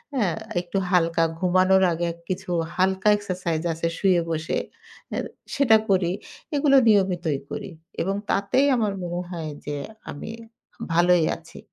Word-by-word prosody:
হ্যাঁ? 200 Hz, -9 st, +1 dB, 0.3 s
একটু 175 Hz, +2 st, -4 dB
হালকা 165 Hz, -2 st, +3 dB, 0.2 s
ঘুমানোর 185 Hz, +1 st, +4 dB
আগে 170 Hz, +1 st, -1 dB, 0.2 s
কিছু 185 Hz, 0 st, -4 dB, 0.3 s
হালকা 190 Hz, +2 st, +1 dB
এক্সারসাইজ 180 Hz, -5 st, -3 dB
আছে 165 Hz, +1 st, -2 dB
শুয়ে 185 Hz, -3 st, +3 dB
বসে, 160 Hz, 0 st, -1 dB, 0.6 s
আ -, -, -2 dB, 0.4 s
সেটা 245 Hz, -6 st, +6 dB
করি। 185 Hz, -3 st, +3 dB, 0.4 s
এগুলো 280 Hz, -1 st, +4 dB
নিয়মিতই 180 Hz, -8 st, +2 dB
করি 205 Hz, -3 st, -5 dB, 0.3 s
এবং 195 Hz, +3 st, 0 dB
তাতেই 255 Hz, +8 st, +2 dB
আমার 215 Hz, -4 st, 0 dB
মনে 175 Hz, 0 st, -3 dB
হয় 160 Hz, -3 st, -4 dB
যে 145 Hz, 0 st, -3 dB, 0.4 s
আমি 145 Hz, +9 st, -7 dB, 0.6 s
ভালোই 175 Hz, -1 st, +4 dB
আছি। 165 Hz, +1 st, -14 dB
180 Hz, 135 wpm, -24 LUFS, 170-195 Hz, 0.6 s, সেটা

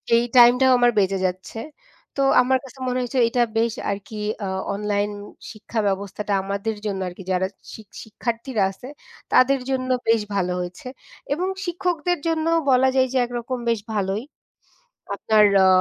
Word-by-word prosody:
এই 235 Hz, -, +4 dB
টাইমটাও 250 Hz, +2 st, +7 dB
আমার 245 Hz, 0 st, +4 dB
বেঁচে 195 Hz, 0 st, +1 dB
যাচ্ছে, 185 Hz, +4 st, -4 dB, 0.6 s
তো -, -, +1 dB, 0.2 s
আমার 260 Hz, +1 st, +2 dB
কাছে 270 Hz, 0 st, -13 dB
মনে 250 Hz, -, 0 dB
হয়েছে 250 Hz, +1 st, -2 dB
এটা 245 Hz, +1 st, +1 dB, 0.2 s
বেশ 225 Hz, 0 st, +1 dB, 0.2 s
আরকি 205 Hz, +2 st, -6 dB, 0.3 s
অ -, -, -2 dB, 0.3 s
অনলাইন 205 Hz, 0 st, -1 dB, 0.4 s
শিক্ষা 220 Hz, +1 st, -5 dB
ব্যবস্থাটা 200 Hz, +1 st, -2 dB
আমাদের 200 Hz, +3 st, -3 dB
জন্য 195 Hz, -2 st, -2 dB
আর 180 Hz, -, -6 dB
কি 190 Hz, -, -9 dB
যারা 185 Hz, +1 st, +1 dB, 0.3 s
শি 220 Hz, -, -9 dB, 0.2 s
শিক্ষার্থীরা 230 Hz, +1 st, -2 dB
আছে 245 Hz, +6 st, -12 dB, 0.5 s
তাদের 270 Hz, +1 st, +5 dB
জন্য 260 Hz, -1 st, -1 dB, 0.2 s
বেশ 225 Hz, -1 st, +4 dB
ভালো 180 Hz, -2 st, 0 dB
হয়েছে 180 Hz, +7 st, -6 dB, 0.5 s
এবং 360 Hz, +5 st, -1 dB, 0.2 s
শিক্ষকদের 350 Hz, 0 st, -1 dB
জন্যও 325 Hz, 0 st, +1 dB
বলা 260 Hz, +1 st, +4 dB
যায় 260 Hz, 0 st, +4 dB
যে 265 Hz, -, +1 dB
একরকম 240 Hz, +1 st, -4 dB
বেশ 230 Hz, -2 st, +1 dB
ভালোই। 200 Hz, +2 st, -1 dB, 0.9 s
আপনার 215 Hz, 0 st, +4 dB, 0.2 s
অ -, -, +6 dB
230 Hz, 155 wpm, -23 LUFS, 200-260 Hz, 0.9 s, টাইমটাও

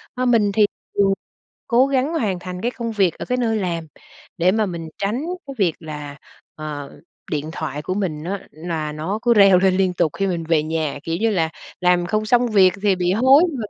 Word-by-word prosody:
À, 255 Hz, 0 st, -1 dB
mình 225 Hz, -5 st, +3 dB
thì 210 Hz, +1 st, +5 dB, 0.3 s
thường 195 Hz, -1 st, +4 dB, 0.5 s
cố 245 Hz, +2 st, +4 dB
gắng 275 Hz, +2 st, 0 dB
hoàn 210 Hz, -, 0 dB
thành 180 Hz, 0 st, -7 dB
cái 240 Hz, -, 0 dB
công 235 Hz, -2 st, -4 dB
việc 195 Hz, -6 st, +2 dB
ở -, -, -4 dB
cái 250 Hz, 0 st, -1 dB
nơi 225 Hz, -3 st, +1 dB
làm 170 Hz, -5 st, -2 dB, 0.5 s
để 180 Hz, +2 st, +4 dB
mà 215 Hz, 0 st, +1 dB
mình 170 Hz, -3 st, -5 dB
tránh 215 Hz, +8 st, -1 dB, 0.2 s
cái 275 Hz, -, -7 dB
việc 180 Hz, -6 st, +2 dB
là, 150 Hz, -3 st, -7 dB, 0.4 s
ờ, 150 Hz, -2 st, -7 dB, 0.3 s
điện 150 Hz, 0 st, -2 dB
thoại 150 Hz, -2 st, -4 dB
của 185 Hz, -, -3 dB
mình 170 Hz, -7 st, -2 dB
á 195 Hz, +3 st, -5 dB
là 155 Hz, -1 st, -4 dB
nó 160 Hz, +8 st, -3 dB
cứ 240 Hz, -1 st, +4 dB
reo 195 Hz, -3 st, +7 dB
lên 185 Hz, 0 st, +3 dB
liên 190 Hz, -1 st, +2 dB
tục 170 Hz, -4 st, +1 dB
khi 195 Hz, -, +1 dB
mình 175 Hz, -3 st, -2 dB
về 160 Hz, -1 st, +2 dB
nhà, 155 Hz, -2 st, -2 dB
kiểu 165 Hz, 0 st, -1 dB
như 225 Hz, 0 st, +2 dB
là, 165 Hz, -6 st, +1 dB, 0.3 s
làm 180 Hz, -1 st, +3 dB
không 215 Hz, +4 st, 0 dB
xong 245 Hz, +2 st, +3 dB
việc 195 Hz, -4 st, +5 dB
về 205 Hz, -2 st, +3 dB
bị 180 Hz, -1 st, 0 dB
hối 260 Hz, -, +6 dB
nhưng 280 Hz, -, -6 dB
mà 225 Hz, -, -3 dB
185 Hz, 225 wpm, -21 LUFS, 165-220 Hz, 0.5 s, reo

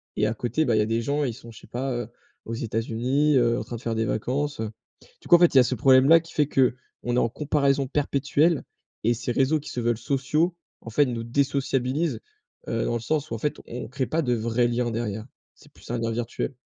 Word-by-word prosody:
Et 105 Hz, -, +2 dB
à 110 Hz, -, 0 dB
côté, 120 Hz, +7 st, -1 dB
bah, 115 Hz, -3 st, +2 dB
il -, -, +3 dB
y -, -, +4 dB
a -, -, +2 dB
des 115 Hz, +1 st, 0 dB
gens, 145 Hz, +4 st, 0 dB
ils 120 Hz, -, -2 dB
sont 115 Hz, -1 st, -12 dB
je 110 Hz, -, -13 dB
sais -, -, -16 dB
pas, 130 Hz, +2 st, -3 dB
heu, 120 Hz, -2 st, -3 dB, 0.4 s
aux 115 Hz, -, -5 dB
États-Unis, 120 Hz, +6 st, 0 dB
heu, 120 Hz, -1 st, +2 dB
en -, -, -4 dB
train 120 Hz, -, -6 dB
de 115 Hz, -, -8 dB
faire 115 Hz, -1 st, -2 dB
des 110 Hz, 0 st, 0 dB
vacances, 140 Hz, +6 st, -2 dB
heu». 110 Hz, -1 st, -3 dB, 0.5 s
Du -, -, -13 dB
coup 175 Hz, -, +8 dB
en -, -, +6 dB
fait, 175 Hz, -3 st, +5 dB
il -, -, +7 dB
y -, -, +10 dB
a -, -, +7 dB
ce 130 Hz, -, -1 dB
problème-là 135 Hz, +5 st, +6 dB
qui 165 Hz, -, -14 dB
fait 150 Hz, -2 st, +2 dB
qu'on 125 Hz, -2 st, -1 dB
est -, -, +2 dB
en 115 Hz, -, +3 dB
comparaison 140 Hz, -1 st, +1 dB
perpétuelle 145 Hz, +3 st, +1 dB, 0.4 s
et 120 Hz, +2 st, +2 dB
ces 120 Hz, +1 st, -3 dB
réseaux 135 Hz, +5 st, +2 dB
qui 145 Hz, -, -9 dB
se 125 Hz, -, -4 dB
veulent 120 Hz, -1 st, +1 dB
sociaux, 145 Hz, +7 st, 0 dB, 0.3 s
en 115 Hz, -, -9 dB
fait 145 Hz, +5 st, +4 dB
nous 115 Hz, -2 st, -3 dB
désociabilisent, 135 Hz, +1 st, 0 dB, 0.5 s
heu, 115 Hz, 0 st, -1 dB
dans -, -, -1 dB
le 120 Hz, -, 0 dB
sens 155 Hz, +4 st, -2 dB
où -, -, -1 dB
en -, -, -2 dB
fait 150 Hz, -, -1 dB
on 125 Hz, +1 st, -6 dB
crée 130 Hz, 0 st, -2 dB
pas 165 Hz, +1 st, 0 dB
de 125 Hz, -4 st, 0 dB
vrais 115 Hz, +2 st, +1 dB
liens 120 Hz, 0 st, -1 dB
derrière. 110 Hz, -1 st, -3 dB, 0.3 s
C'est -, -, -20 dB
plus -, -, -16 dB
un 120 Hz, -, -1 dB
lien 115 Hz, 0 st, -1 dB
virtuel. 120 Hz, +4 st, -3 dB
125 Hz, 255 wpm, -25 LUFS, 115-140 Hz, 0.5 s, y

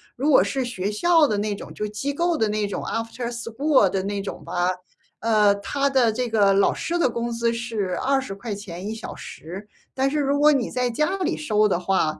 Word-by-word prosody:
如 275 Hz, +5 st, 0 dB
果 280 Hz, -, +7 dB
是 270 Hz, -1 st, -1 dB
学 205 Hz, -6 st, -3 dB
校 325 Hz, +8 st, +4 dB
的 210 Hz, -, 0 dB
那 210 Hz, 0 st, -1 dB
种 -, -, -9 dB
就 210 Hz, -, -3 dB
机 215 Hz, +7 st, -3 dB
构 340 Hz, +2 st, +1 dB
的 220 Hz, -, +2 dB
那 210 Hz, 0 st, 0 dB
种 200 Hz, -, -4 dB
After 230 Hz, +1 st, -3 dB
school 235 Hz, 0 st, +2 dB
的 190 Hz, 0 st, -1 dB
那 200 Hz, 0 st, -2 dB
种 195 Hz, -, -7 dB
吧， 175 Hz, 0 st, 0 dB, 0.5 s
呃， 215 Hz, -2 st, +4 dB
它 275 Hz, +8 st, -1 dB
的 250 Hz, -5 st, +3 dB
这 245 Hz, +1 st, -2 dB
个 205 Hz, -3 st, +4 dB
老 195 Hz, 0 st, +3 dB
师 345 Hz, -, -2 dB
的 340 Hz, -, +3 dB
工 235 Hz, 0 st, -3 dB
资 235 Hz, 0 st, 0 dB
是 225 Hz, -6 st, -3 dB
¥20 205 Hz, -8 st, -3 dB
1 220 Hz, -, -4 dB
小 220 Hz, -, -7 dB
时， 185 Hz, +6 st, -9 dB, 0.3 s
但 270 Hz, +1 st, +1 dB
是 300 Hz, +2 st, -1 dB
如 280 Hz, 0 st, +1 dB
果 300 Hz, +1 st, +6 dB
你 265 Hz, -4 st, 0 dB
在 250 Hz, -1 st, 0 dB
家 305 Hz, +11 st, 0 dB
里 370 Hz, -, -1 dB
收 215 Hz, -7 st, +2 dB
的 190 Hz, -, +1 dB
话， 175 Hz, -4 st, 0 dB
230 Hz, 260 characters per minute, -23 LUFS, 205-270 Hz, 0.5 s, 果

